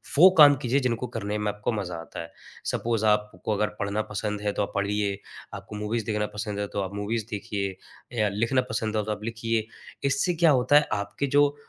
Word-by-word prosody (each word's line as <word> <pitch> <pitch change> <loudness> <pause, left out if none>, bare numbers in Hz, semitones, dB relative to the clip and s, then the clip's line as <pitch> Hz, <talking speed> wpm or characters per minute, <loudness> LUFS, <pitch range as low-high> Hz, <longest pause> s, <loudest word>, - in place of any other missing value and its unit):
वो 175 +6 +9
काम 145 -2 +9
कीजिए 125 +3 +2
जिनको 125 -1 -1
करने 105 -1 -2
में 105 0 0
आपको 105 +3 -2
मज़ा 90 -5 -3
आता 80 0 -7
है। 85 - -9 0.4
सपोज़ 115 -2 0
आपको 105 0 +1
अगर 105 +1 +1
पढ़ना 100 +1 0
पसंद 105 0 -2
है 105 0 0
तो 105 - 0
आप - - -5
पढ़िए, 100 0 0 0.4
आपको 105 - -8
मूवीज़ 105 +1 -2
देखना 105 -1 0
पसंद 105 -1 -3
है 100 - -1
तो 100 - 0
आप 95 0 -4
मूवीज़ 105 +2 -2
देखिए 100 -2 -3 0.4
या 105 -1 +3
लिखना 115 +6 +1
पसंद 110 0 -1
है 105 - +1
तो 110 - -2
आप 105 0 -4
लिखिए। 115 -1 -1 0.4
इससे 175 +6 +1
क्या 165 -1 +5
होता 130 +1 +3
है, 150 - +3
आपके 100 +7 -2
जो 145 +1 +3
105 Hz, 210 wpm, -26 LUFS, 105-115 Hz, 0.4 s, वो